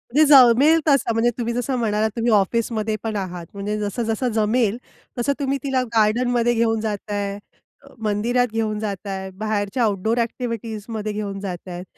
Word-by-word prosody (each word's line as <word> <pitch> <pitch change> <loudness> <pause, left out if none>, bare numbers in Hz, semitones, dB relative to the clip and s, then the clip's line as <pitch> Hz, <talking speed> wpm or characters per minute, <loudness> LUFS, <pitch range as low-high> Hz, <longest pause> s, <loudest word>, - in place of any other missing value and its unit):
जे 310 - +7
जमेल 275 +3 +7
तसं. 275 -5 +3
म्हणजे 230 +2 +2
तुम्ही 235 -1 -2
जसं 245 +2 -1
म्हणालात, 215 -1 +1
तुम्ही 230 0 +1
ऑफिसमध्ये 215 +1 +1
पण 220 -1 -3
आहात. 180 -3 -4
म्हणजे 205 +1 -3
जसं-जसं 225 +3 -2
जमेल 220 0 +2 0.4
तसं 240 +4 +1
तुम्ही 275 0 0
तिला 265 -2 +1
गार्डनमध्ये 240 +2 +2
घेऊन 225 -1 +1
जाताय, 205 -2 -3 0.5
अ, - - -17
मंदिरात 235 +4 +1
घेऊन 215 -2 -1
जाताय, 195 -2 -4
बाहेरच्या 215 +2 -1
आउटडोअर 220 +2 0
ॲक्टिव्हिटीजमध्ये 225 -2 -4
घेऊन 200 -2 -4
जातायत. 180 -2 -6
220 Hz, 145 wpm, -22 LUFS, 205-240 Hz, 0.5 s, जे